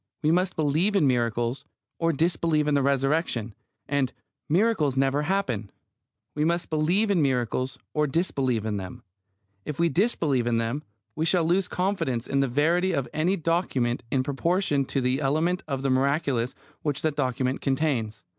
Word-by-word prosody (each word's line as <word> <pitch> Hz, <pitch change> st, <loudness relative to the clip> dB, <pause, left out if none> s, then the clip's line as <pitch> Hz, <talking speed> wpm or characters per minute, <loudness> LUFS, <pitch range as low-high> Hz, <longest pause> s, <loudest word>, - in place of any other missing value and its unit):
We 155 Hz, -, +3 dB
must 180 Hz, +2 st, +1 dB
believe 160 Hz, +7 st, +1 dB
in 190 Hz, -, +4 dB
miracles, 120 Hz, 0 st, 0 dB, 0.4 s
or 165 Hz, 0 st, +2 dB
disbelieve 160 Hz, -1 st, +1 dB
in 150 Hz, -, +2 dB
the 140 Hz, -, +3 dB
Resurrection; 135 Hz, -4 st, 0 dB, 0.3 s
and 140 Hz, -3 st, 0 dB, 0.4 s
"miracles 165 Hz, -, +2 dB
never 135 Hz, +2 st, +2 dB
happen." 145 Hz, -, -1 dB, 0.6 s
We 150 Hz, -, -1 dB
must 170 Hz, +2 st, 0 dB
believe 180 Hz, +7 st, +2 dB
miracles, 130 Hz, -4 st, 0 dB, 0.2 s
or 150 Hz, -1 st, +1 dB
disbelieve 135 Hz, -, 0 dB
them. 100 Hz, -4 st, -5 dB, 0.6 s
If 150 Hz, -, -5 dB
we 170 Hz, 0 st, +3 dB
disbelieve 155 Hz, -, +1 dB
them, 115 Hz, +3 st, 0 dB, 0.3 s
we 155 Hz, -, 0 dB
shall 175 Hz, -1 st, +3 dB
lose 180 Hz, +3 st, +2 dB
confidence 180 Hz, -, -1 dB
in 140 Hz, -, 0 dB
the 135 Hz, -, +2 dB
verity 170 Hz, +8 st, +2 dB
of 140 Hz, -5 st, -1 dB
any 170 Hz, +5 st, +1 dB
document 155 Hz, -8 st, 0 dB
in 130 Hz, 0 st, +1 dB
proportion 145 Hz, +1 st, 0 dB
to 135 Hz, -, -1 dB
the 130 Hz, +3 st, 0 dB
element 160 Hz, +6 st, +1 dB
of 135 Hz, -2 st, -3 dB
the 135 Hz, -, +1 dB
miraculous 135 Hz, -2 st, +1 dB, 0.3 s
which 145 Hz, -4 st, -2 dB
that 155 Hz, -2 st, 0 dB
document 130 Hz, -1 st, -1 dB
contains. 130 Hz, -6 st, -1 dB
145 Hz, 155 wpm, -26 LUFS, 130-165 Hz, 0.6 s, in